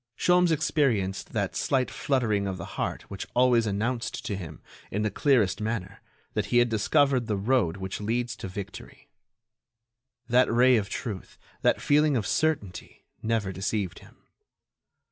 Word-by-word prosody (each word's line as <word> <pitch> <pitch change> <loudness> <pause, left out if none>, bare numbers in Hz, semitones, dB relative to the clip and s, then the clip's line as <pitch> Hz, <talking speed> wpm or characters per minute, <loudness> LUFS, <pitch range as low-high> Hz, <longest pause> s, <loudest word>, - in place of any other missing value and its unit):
Sholmes 180 0 +4
experienced 125 - 0
that - - -1
slight 130 -2 0
fluttering 110 -7 0
of 95 -1 -3
the - - -6
heart - - -3
which 100 - -7
always 120 -2 +4
announced 115 +4 -2
to 100 - -2
him, 80 -5 -8 0.3
in 105 +2 -2
the 110 - 0
clearest 110 -5 +2
manner, 110 -4 -4 0.3
that - - -1
he 120 - +2
had 120 0 +4
discovered 130 +3 +2
the 105 -3 0
road 100 -5 +1
which 95 +1 -5
leads 120 +3 -1
to - - -6
victory. 95 +1 -9 1.2
That 125 0 +4
ray 125 +2 +5
of 100 -2 -2
truth, 100 -3 -6 0.2
that - - +3
feeling 150 -1 +3
of 105 - -2
certainty, 145 - -2 0.2
never 110 -3 0
deceived 95 -1 -2
him. - - -19
115 Hz, 150 wpm, -27 LUFS, 100-130 Hz, 1.2 s, ray